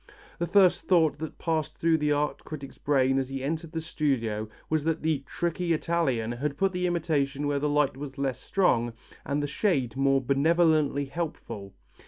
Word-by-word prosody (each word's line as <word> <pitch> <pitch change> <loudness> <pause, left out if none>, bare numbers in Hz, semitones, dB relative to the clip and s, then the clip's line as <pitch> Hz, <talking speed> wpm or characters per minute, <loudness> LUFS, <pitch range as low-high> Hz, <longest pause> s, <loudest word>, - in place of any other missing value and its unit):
The 170 - 0
first 190 -2 +4
thought 160 -5 +3
that 160 0 -6
passed 160 -2 -2
through 165 -1 +2
the 150 0 +1
art 145 0 0
critic's 140 -3 -8
brain 135 -2 +2
as 130 -1 -3
he 135 -1 -4
entered 160 +3 -3
the 165 -1 -3
studio 115 -10 -1 0.2
was 155 -2 0
that 165 0 -1
the 155 -3 +1
"tricky 170 0 -1
Italian" 150 -9 0
had 140 +4 -3
put 195 +2 +2
the 180 0 -1
imitation 150 -5 0
where 145 -1 +1
the 150 +1 0
light 145 -2 +2
was 135 -1 -7
less 135 -2 -1
strong 120 -12 +1 0.3
and 145 +1 -1
the - - +1
shade 140 - 0
more 135 0 +3
benevolently 145 +1 +2
helpful. 125 - -6
150 Hz, 180 wpm, -27 LUFS, 135-165 Hz, 0.3 s, first